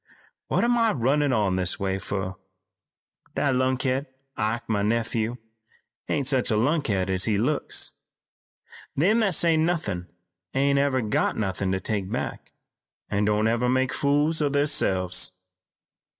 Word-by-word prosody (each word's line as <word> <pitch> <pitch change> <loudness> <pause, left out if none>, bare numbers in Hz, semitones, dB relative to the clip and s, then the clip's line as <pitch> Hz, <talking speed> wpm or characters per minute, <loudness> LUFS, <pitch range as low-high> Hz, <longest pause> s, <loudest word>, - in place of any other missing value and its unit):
What - - +1
am 240 0 +3
I 225 -2 +3
runnin' 140 +3 +1
on 100 -6 +1
this 95 +2 0
way 95 -1 -1
fur? 95 -1 -3 1.0
That 140 -2 +1
lunkhead, 130 +2 0 0.3
Ike, 110 +2 -2
my 105 -2 0
nephew, 115 +2 -1 0.7
ain't 140 -2 0
such 130 -3 +2
a 110 - +2
lunkhead 115 - +1
as 95 0 +1
he 105 -3 +1
looks. 135 +8 -1 1.0
Them 200 +10 +3
that 200 -6 +2
say 165 0 +4
nothin' 155 - -1 0.5
ain't 140 +1 +3
never 140 -2 +2
got 105 - 0
nothin' 95 -2 -1
to 95 - 0
take 100 -2 -3
back, - - -4 0.6
an' 105 0 +1
don't 105 +1 +2
never 120 +2 +1
make 130 +1 +1
fools 145 +3 +2
o' 145 - +2
theirselves. 95 -12 +1
125 Hz, 140 wpm, -25 LUFS, 100-145 Hz, 1.0 s, say